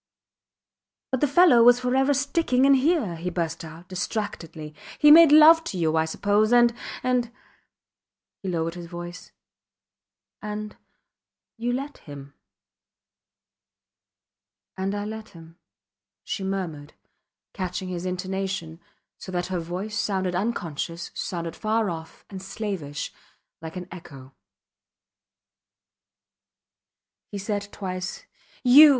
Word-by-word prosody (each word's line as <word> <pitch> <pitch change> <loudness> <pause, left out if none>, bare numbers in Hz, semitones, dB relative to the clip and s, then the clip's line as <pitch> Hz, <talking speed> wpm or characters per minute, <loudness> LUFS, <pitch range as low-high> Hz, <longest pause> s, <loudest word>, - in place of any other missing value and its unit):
But 260 - -1
the 295 - +4
fellow 290 -4 +6
was 245 +1 +7
forever 260 +2 +2
sticking 275 -2 +2
in 275 - +6
here, 270 - +2
he 175 +2 -3
burst 165 -2 -3
out, 165 +2 -11
distractedly. 175 -5 -4 0.2
He 295 - +7
made 325 -1 +9
love 315 +2 +8
to 190 - -4
you, 160 -2 +1
I 160 0 +3
suppose 205 +6 +1
and, 240 -1 +5 0.3
and... 250 -2 +1 1.1
He 195 - -4
lowered 165 -1 -1
his 175 -1 -8
voice. 175 +1 -8 1.1
And 210 0 -5 0.8
you 240 +1 -2
let 275 +3 -4
him. 140 -2 -11 2.4
And 195 +1 -2
I 205 0 -3
let 220 0 -7
him, 165 -2 -15 0.7
she 195 - -4
murmured, 170 -7 -4 0.6
catching 185 0 -4
his 175 -1 -4
intonation, 185 -2 -3 0.4
so 185 - -8
that 180 -1 -2
her 185 -1 -2
voice 180 +6 -5
sounded 190 -4 -1
unconscious, 170 -4 -3
sounded 170 -2 -4
far 215 -2 0
off 160 -1 -9
and 190 -2 -8
slavish, 190 -8 -5 0.5
like 160 +1 -8
an 180 -1 -6
echo. 135 -7 -11 3.0
He 205 - -4
said 205 0 -3
twice, 185 0 -5 0.4
You! 280 +5 +9
190 Hz, 115 wpm, -25 LUFS, 170-235 Hz, 3.0 s, made